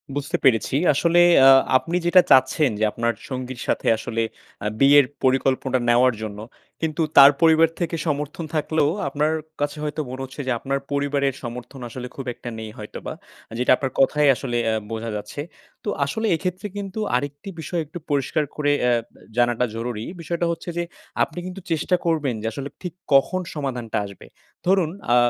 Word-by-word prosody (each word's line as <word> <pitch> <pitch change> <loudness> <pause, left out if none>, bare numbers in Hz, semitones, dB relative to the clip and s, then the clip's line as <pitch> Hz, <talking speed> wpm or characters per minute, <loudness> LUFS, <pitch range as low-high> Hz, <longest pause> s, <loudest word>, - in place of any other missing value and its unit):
বুঝতে 145 +5 -1
পেরেছি 125 -1 +3 0.2
আসলে 170 +4 +3 0.3
আ - - +10 0.3
আপনি 165 +6 -4
যেটা 180 +1 +7
চাচ্ছেন 135 +2 +5
যে - - 0
আপনার 115 +1 -1 0.2
সঙ্গীর 130 -1 -5
সাথে - - -1
আসলে, 115 +1 -3 0.4
আ - - +2
বিয়ের 140 0 +7 0.2
পরিকল্পনা 130 0 +2
নেওয়ার 125 +2 +5
জন্য, 105 -2 -6 0.4
কিন্তু 160 0 -1 0.2
তার 140 +1 +11
পরিবার 160 0 +5
থেকে 170 -1 -1
সমর্থন 150 +2 -2
থাকলেও 155 -1 +1 0.2
আপনার, 150 +3 0 0.3
কাছে 145 +1 -1
হয়তো 150 +1 -2
মনে 130 +1 -6
হচ্ছে 130 +2 -7
যে - - +1
আপনার 135 +2 -2
পরিবারের 140 -1 0
সমর্থন 125 +3 -7
আসলে 125 +2 -6
খুব 135 - -6
একটা 120 - -8
নেই 110 -1 -6
হয়তোবা। - - -7 0.4
আ - - -8
যেটা 125 - +3
আপনার 135 0 -3
কথায় 145 +2 +4
আসলে 120 -2 -3
এ - - +2 0.2
বোঝা 115 +1 -4
যাচ্ছে। 105 +7 -5 0.4
তো - - -1 0.2
আসলে 220 +10 -2
এক্ষেত্রে 180 +4 -3
কিন্তু 200 +1 -5 0.2
আরেকটি 145 +7 -3
বিষয় 165 +1 -2
একটু 160 +4 -9
পরিষ্কার 145 +2 +1
করে 145 -1 +1 0.2
এ - - +4 0.5
জানাটা 120 0 +2
জরুরি। 115 -1 -4 0.2
বিষয়টা 170 +1 -2
হচ্ছে 170 +1 -6
যে, 175 - +1 0.4
আপনি 165 - -5
কিন্তু 185 +1 -7
চেষ্টা 165 +3 +1
করবেন 155 -6 +1
যে 110 - -3
আসলে 140 +4 -5
ঠিক 180 -3 -5 0.2
কখন 160 +7 +4
সমাধানটা 125 -6 -3
আসবে। 100 -2 -11 0.4
ধরুন 185 -4 +3 0.2
আ - - +6
140 Hz, 170 wpm, -23 LUFS, 125-160 Hz, 0.5 s, তার